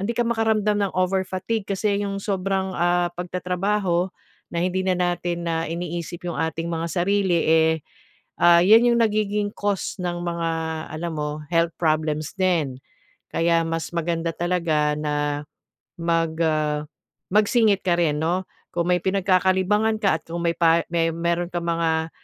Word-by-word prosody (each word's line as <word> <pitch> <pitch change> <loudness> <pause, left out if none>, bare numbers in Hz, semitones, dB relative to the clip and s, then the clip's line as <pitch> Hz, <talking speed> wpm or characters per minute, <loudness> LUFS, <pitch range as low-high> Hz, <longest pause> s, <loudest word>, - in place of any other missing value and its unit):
hindi 205 +5 -1
ka 240 - +3
makaramdam 220 -2 +1
ng - - -7
over 185 +1 +2
fatigue 195 +4 -3
kasi 200 +1 0
'yong 200 -1 -3
sobrang, 195 -1 -1
ah, 175 0 +2
pagtatrabaho 180 +1 -1 0.5
na 170 - -2
hindi 185 +1 0
na 185 - +3
natin, 175 -1 -1
ah, 165 0 -1
iniisip 170 +1 -5
'yong 175 - -3
ating 160 +1 -2
mga 165 0 -2
sarili 190 0 +1
eh, 160 0 +4 0.7
ah, 170 0 +7
'yan 225 +5 +6
'yong 235 - +2
nagiging 210 -1 0
cause 200 -2 -2
ng 175 -1 -2
mga 170 -1 -2 0.5
alam 170 +1 -4
mo, 150 0 -3
health 165 0 +3
problems 155 -1 0
din. 165 -9 0 0.5
Kaya 165 0 +2
mas 165 0 -3
maganda 165 0 -1
talaga 165 -4 +1
na 145 -1 -1 0.6
mag, 165 -1 0
ah, 155 -1 0 0.5
magsingit 210 -1 +3
ka 180 -2 +3
rin 150 -4 +1
no? 175 +3 0 0.3
Kung 170 0 0
may 180 - +4
pinagkakalibangan 190 +3 +2
ka 190 -6 +3
at - - -37
kung 170 +1 -4
may 170 - +2
pa 165 0 +4
may 165 -1 +2
meron 170 +1 0
kang 175 -1 -3
mga, 160 -1 0
175 Hz, 155 wpm, -23 LUFS, 165-195 Hz, 0.7 s, ah